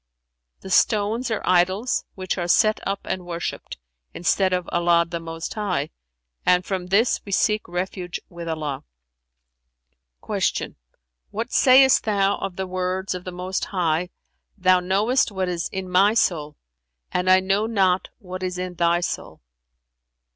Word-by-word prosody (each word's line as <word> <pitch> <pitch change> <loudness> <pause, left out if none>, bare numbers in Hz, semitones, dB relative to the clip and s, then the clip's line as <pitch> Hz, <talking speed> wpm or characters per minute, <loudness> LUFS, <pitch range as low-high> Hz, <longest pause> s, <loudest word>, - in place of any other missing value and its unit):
[FN#378] - - -54
"The 190 - -9
stones 215 +5 +2
are 220 - -1
idols, 185 +7 +2
which 185 -1 -3
are 175 - -2
set 215 +4 +3
up 195 0 -2
and 185 - -3
worshipped, 170 - -5 0.4
instead 185 +2 +1
of 180 -1 -1
Allah 170 0 +3
the 170 0 -4
Most 165 0 -6
High, 180 -9 -2 0.5
and 180 0 +3
from 185 -2 -3
this 205 +6 +2
we 200 - -9
seek 210 +2 +1
refuge 180 0 -4
with 170 -1 -9
Allah." 150 -4 -3 1.4
Q - - -1 0.6
"What 230 +4 -4
sayest 265 0 +6
thou 200 -2 +1
of 185 - -4
the 190 - -3
words 185 +1 -2
of 180 0 -7
the 185 - -5
Most 180 +1 -3
High 175 -2 0 0.5
'Thou 185 -1 +4
knowest 205 +8 +1
what 190 -2 -2
is 175 -1 -2
in 190 -1 -4
my 195 +4 +4
soul, 150 -9 0 0.5
and 180 +1 0
I 185 0 +7
know 195 +3 0
not 190 -4 +2
what 185 -3 -8
is 185 -1 -3
in 180 0 -4
Thy 170 0 +2
soul'"? 175 - -5
185 Hz, 155 wpm, -23 LUFS, 175-195 Hz, 1.4 s, I